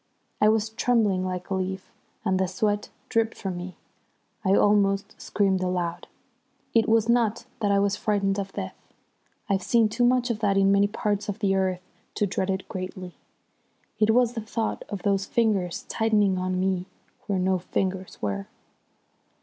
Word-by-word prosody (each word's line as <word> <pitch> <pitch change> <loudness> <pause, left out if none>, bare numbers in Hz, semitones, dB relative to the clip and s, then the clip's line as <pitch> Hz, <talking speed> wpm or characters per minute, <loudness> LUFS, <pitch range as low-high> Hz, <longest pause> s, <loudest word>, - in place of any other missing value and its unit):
I 210 - +6
was 220 0 +2
trembling 220 -5 +1
like 185 0 -4
a - - +2
leaf, 190 0 -3 0.3
and 185 0 +2
the 190 - +2
sweat 205 +3 -1 0.2
dripped 225 0 0
from 190 -2 -4
me. 180 +1 -7 0.7
I 195 -1 +4
almost 200 0 +3
screamed 195 -2 +1
aloud. 180 -2 -2 0.7
It 225 -1 +3
was 225 0 +4
not 235 -2 +2
that 210 -2 +1
I 200 - +4
was 200 0 +2
frightened 200 -2 0
of 195 -1 -4
death. 95 - -5 0.7
I've 195 -1 +1
seen 230 +2 +3
too 230 +3 0
much 245 0 +3
of 220 - -3
that 200 -3 +2
in 195 0 +4
many 200 0 +4
parts 205 -1 -2
of 205 - -3
the 200 -3 +1
earth 185 -1 0 0.3
to 205 - +1
dread 190 0 -2
it 190 0 -2
greatly. 185 -1 -6 0.9
It 215 0 +3
was 240 +1 +4
the 230 - -4
thought 220 +1 -3
of 200 -3 -5
those 195 -1 +1
fingers 205 -7 0
tightening 210 -4 +2
on 185 0 -1
me 185 -1 0 0.4
where 200 - 0
no 185 0 +1
fingers 185 +1 -3
were. 100 -1 -2
195 Hz, 170 wpm, -26 LUFS, 185-215 Hz, 0.9 s, I